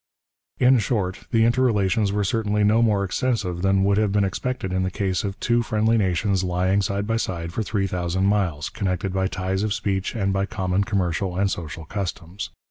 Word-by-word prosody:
In 125 Hz, 0 st, +5 dB
short, 95 Hz, -4 st, -2 dB
the 115 Hz, -2 st, +3 dB
interrelations 115 Hz, -4 st, +2 dB
were 105 Hz, 0 st, 0 dB
certainly 105 Hz, +1 st, 0 dB
no 110 Hz, +3 st, +4 dB
more 105 Hz, -4 st, +2 dB
extensive 100 Hz, -3 st, -1 dB
than 95 Hz, 0 st, +3 dB
would 100 Hz, +1 st, +3 dB
have 105 Hz, -2 st, +1 dB
been 105 Hz, 0 st, +2 dB
expected 95 Hz, +1 st, -2 dB
in 95 Hz, -, +1 dB
the 95 Hz, -, 0 dB
case 95 Hz, -1 st, -1 dB
of 100 Hz, -1 st, -4 dB
two 120 Hz, 0 st, +2 dB
friendly 110 Hz, 0 st, +1 dB
nations 95 Hz, -1 st, +1 dB
lying 95 Hz, +2 st, +1 dB
side 100 Hz, +1 st, -1 dB
by 115 Hz, +1 st, 0 dB
side 85 Hz, -6 st, -3 dB
for 110 Hz, -, -1 dB
three 105 Hz, -2 st, -1 dB
thousand 90 Hz, 0 st, -1 dB
miles, 95 Hz, -7 st, 0 dB
connected 95 Hz, -1 st, -2 dB
by 95 Hz, 0 st, +1 dB
ties 95 Hz, +1 st, -2 dB
of 105 Hz, -1 st, 0 dB
speech 95 Hz, 0 st, -2 dB
and 100 Hz, -3 st, 0 dB
by 95 Hz, 0 st, 0 dB
common 95 Hz, 0 st, 0 dB
commercial 95 Hz, -3 st, -1 dB
and 100 Hz, 0 st, +1 dB
social 80 Hz, -1 st, -5 dB
customs. 95 Hz, 0 st, -5 dB
100 Hz, 195 wpm, -23 LUFS, 95-105 Hz, -, In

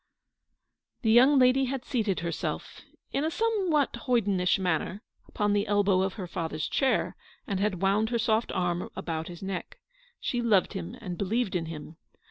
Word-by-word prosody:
The 220 Hz, -, +3 dB
young 260 Hz, +5 st, +7 dB
lady 260 Hz, +1 st, +5 dB
had 260 Hz, 0 st, -4 dB
seated 215 Hz, -7 st, 0 dB
herself, 170 Hz, -1 st, -4 dB, 0.3 s
in 280 Hz, -, 0 dB
a 315 Hz, -, +1 dB
some 415 Hz, +1 st, 0 dB
what 295 Hz, -3 st, +2 dB
hoydenish 200 Hz, -7 st, +2 dB
manner, 185 Hz, +2 st, -1 dB, 0.2 s
upon 205 Hz, -1 st, 0 dB
the 205 Hz, +1 st, +1 dB
elbow 200 Hz, -2 st, +3 dB
of 190 Hz, 0 st, 0 dB
her 190 Hz, -, -5 dB
father's 160 Hz, -3 st, -3 dB
chair, 270 Hz, -1 st, +1 dB, 0.3 s
and 200 Hz, -8 st, -2 dB
had 195 Hz, -2 st, -1 dB
wound 205 Hz, +3 st, +2 dB
her 235 Hz, -, 0 dB
soft 225 Hz, 0 st, +1 dB
round 175 Hz, -1 st, 0 dB
arm -, -, -6 dB
about 160 Hz, -1 st, -3 dB
his 175 Hz, +1 st, -9 dB
neck. 190 Hz, -, -5 dB, 0.4 s
She 245 Hz, -, -1 dB
loved 210 Hz, -6 st, +3 dB
him 85 Hz, 0 st, -5 dB
and 175 Hz, -2 st, -6 dB
believed 205 Hz, +1 st, 0 dB
in 165 Hz, -2 st, -1 dB
him. 160 Hz, 0 st, -8 dB
205 Hz, 175 wpm, -28 LUFS, 180-245 Hz, 0.4 s, young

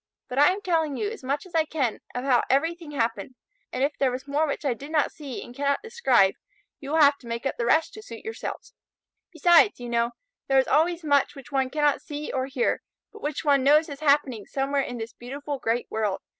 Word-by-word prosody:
But 250 Hz, -, -2 dB
I 290 Hz, -, +7 dB
am 380 Hz, +3 st, +1 dB
telling 320 Hz, -7 st, 0 dB
you 415 Hz, 0 st, -2 dB
as 445 Hz, -, -9 dB
much 280 Hz, +5 st, -2 dB
as 370 Hz, -, -16 dB
I 325 Hz, -1 st, +3 dB
can 280 Hz, -7 st, -2 dB, 0.2 s
of 250 Hz, -, -2 dB
how 255 Hz, -3 st, +4 dB
everything 325 Hz, +4 st, 0 dB
happened, 245 Hz, -2 st, -2 dB, 0.4 s
and 260 Hz, -, -1 dB
if 285 Hz, +1 st, -1 dB
there 270 Hz, -, +3 dB
was 255 Hz, +2 st, -5 dB
more 295 Hz, +3 st, +1 dB
which 290 Hz, +1 st, -4 dB
I 270 Hz, -, +2 dB
did 275 Hz, +6 st, -10 dB
not 305 Hz, -2 st, +2 dB
see 280 Hz, -5 st, -7 dB
and 240 Hz, -, -12 dB
cannot 280 Hz, -, 0 dB
describe, 265 Hz, -, +3 dB, 0.5 s
you 275 Hz, -, -8 dB
will 320 Hz, +2 st, +2 dB
have 285 Hz, -1 st, +5 dB
to 240 Hz, -, -14 dB
make 235 Hz, +2 st, -4 dB
up 270 Hz, -, -1 dB
the 235 Hz, -, -1 dB
rest 315 Hz, +6 st, +3 dB
to 435 Hz, -, -9 dB
suit 230 Hz, -, -11 dB
yourselves. -, -, -6 dB, 0.6 s
Besides, 345 Hz, +3 st, +5 dB
you 245 Hz, -1 st, -6 dB
know, 235 Hz, 0 st, 0 dB, 0.3 s
there 270 Hz, -, +3 dB
is 265 Hz, -, +5 dB
always 330 Hz, +4 st, +2 dB
much 290 Hz, -1 st, +2 dB
which 275 Hz, -1 st, -12 dB
one 265 Hz, -2 st, +1 dB
cannot 295 Hz, 0 st, +1 dB
see 295 Hz, 0 st, -6 dB
or 260 Hz, 0 st, -1 dB
hear, 260 Hz, -3 st, 0 dB, 0.3 s
but 430 Hz, -, -12 dB
which 295 Hz, +1 st, -3 dB
one 280 Hz, -2 st, +4 dB
knows 300 Hz, +4 st, +5 dB
is 280 Hz, -1 st, -7 dB
happening 280 Hz, -8 st, +2 dB
somewhere 275 Hz, +1 st, 0 dB
in 245 Hz, -2 st, -5 dB
this 225 Hz, 0 st, -6 dB
beautiful 280 Hz, +3 st, -6 dB
great 230 Hz, +1 st, 0 dB
world. 210 Hz, -3 st, -1 dB
280 Hz, 230 wpm, -26 LUFS, 255-310 Hz, 0.6 s, I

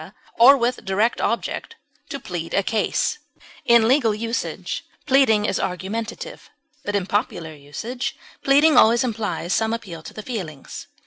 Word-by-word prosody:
or 270 Hz, +4 st, +9 dB
with 245 Hz, 0 st, -1 dB
direct 210 Hz, +4 st, 0 dB
object, 235 Hz, -, -2 dB, 0.3 s
to 280 Hz, -3 st, -5 dB
plead 175 Hz, -7 st, -5 dB
a 200 Hz, -, +2 dB
case; 225 Hz, -, 0 dB, 0.5 s
in 235 Hz, -2 st, +5 dB
legal 240 Hz, -4 st, +3 dB
usage, 230 Hz, +2 st, -3 dB, 0.2 s
pleading 260 Hz, -7 st, +4 dB
is 195 Hz, -, 0 dB
argumentative, 225 Hz, -, -5 dB, 0.3 s
but 205 Hz, -, -2 dB
in 195 Hz, -3 st, 0 dB
popular 175 Hz, -5 st, -2 dB
usage, 150 Hz, -, -5 dB, 0.3 s
pleading 290 Hz, +3 st, +5 dB
always 230 Hz, +3 st, +6 dB
implies 210 Hz, -8 st, -2 dB
some 220 Hz, 0 st, +1 dB
appeal 195 Hz, -8 st, -6 dB
to -, -, -11 dB
the 215 Hz, -, -7 dB
feelings. 175 Hz, -, -7 dB
220 Hz, 140 wpm, -22 LUFS, 190-245 Hz, 0.5 s, or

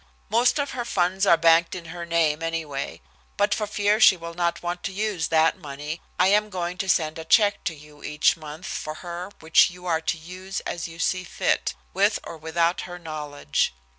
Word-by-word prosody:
"Most 240 Hz, +4 st, +3 dB
of 285 Hz, -1 st, -1 dB
her 245 Hz, -, -3 dB
funds 190 Hz, -3 st, +1 dB
are 170 Hz, -, +7 dB
banked 165 Hz, +1 st, +4 dB
in 175 Hz, -2 st, -7 dB
her 170 Hz, -1 st, -6 dB
name, 165 Hz, -2 st, +2 dB
anyway. 160 Hz, -, -4 dB, 0.4 s
But -, -, +3 dB
for 210 Hz, -, -2 dB
fear 210 Hz, +1 st, +1 dB
she 190 Hz, -, +7 dB
will 170 Hz, 0 st, -7 dB
not 170 Hz, 0 st, -1 dB
want 175 Hz, 0 st, -3 dB
to -, -, -2 dB
use 200 Hz, -4 st, -1 dB
that 160 Hz, 0 st, +3 dB
money 150 Hz, +2 st, -6 dB, 0.2 s
I 180 Hz, -, +4 dB
am 210 Hz, +1 st, +3 dB
going 180 Hz, -1 st, -4 dB
to 195 Hz, -, -2 dB
send 160 Hz, -2 st, +1 dB
a -, -, -5 dB
check 205 Hz, +5 st, +3 dB
to 165 Hz, -, -1 dB
you 150 Hz, 0 st, -16 dB
each 150 Hz, 0 st, +2 dB
month 155 Hz, +2 st, -9 dB
for 155 Hz, -4 st, -4 dB
her 175 Hz, +2 st, -5 dB
which 160 Hz, +3 st, +5 dB
you 180 Hz, 0 st, -12 dB
are 165 Hz, -2 st, +1 dB
to 165 Hz, -, -1 dB
use 185 Hz, +4 st, -6 dB
as 170 Hz, -, -4 dB
you 165 Hz, 0 st, -11 dB
see 185 Hz, +2 st, 0 dB
fit, -, -, -1 dB, 0.2 s
with -, -, +3 dB
or -, -, -8 dB
without 165 Hz, +2 st, 0 dB
her 175 Hz, -, -7 dB
knowledge. 150 Hz, -, -2 dB
170 Hz, 205 wpm, -25 LUFS, 160-185 Hz, 0.4 s, are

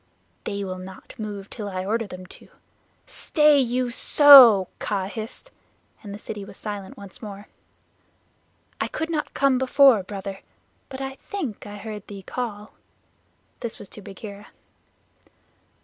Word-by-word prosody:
"They 200 Hz, 0 st, -3 dB
will 185 Hz, -1 st, -5 dB
not 185 Hz, 0 st, -11 dB
move 205 Hz, -2 st, -6 dB
till 210 Hz, -2 st, -6 dB
I 185 Hz, -1 st, -4 dB
order 225 Hz, +2 st, -1 dB
them. 185 Hz, -1 st, -9 dB, 0.8 s
Stay 300 Hz, -2 st, +3 dB
you 250 Hz, 0 st, +1 dB
sssso!" 250 Hz, -6 st, +8 dB
Kaa 195 Hz, -2 st, -2 dB
hissed, 220 Hz, -, -8 dB, 0.5 s
and 205 Hz, -, -9 dB
the 200 Hz, -, -6 dB
city 210 Hz, -1 st, -7 dB
was 195 Hz, -, -12 dB
silent 205 Hz, -3 st, -6 dB
once 200 Hz, -2 st, -11 dB
more. 205 Hz, -2 st, -9 dB, 1.3 s
"I -, -, 0 dB
could 320 Hz, +1 st, -4 dB
not 305 Hz, -2 st, -3 dB
come 275 Hz, -2 st, +3 dB
before, 260 Hz, -3 st, +5 dB
Brother, 195 Hz, 0 st, -7 dB, 0.5 s
but 265 Hz, 0 st, -7 dB
I 270 Hz, 0 st, -5 dB
think 280 Hz, -, -4 dB
I 205 Hz, 0 st, -8 dB
heard 210 Hz, 0 st, -8 dB
thee 200 Hz, -2 st, -9 dB
call" 215 Hz, -2 st, -5 dB, 0.9 s
this 235 Hz, -, -5 dB
was 200 Hz, -, -11 dB
to 210 Hz, -, -9 dB
Bagheera. 200 Hz, +1 st, -10 dB
210 Hz, 140 wpm, -24 LUFS, 200-255 Hz, 1.3 s, sssso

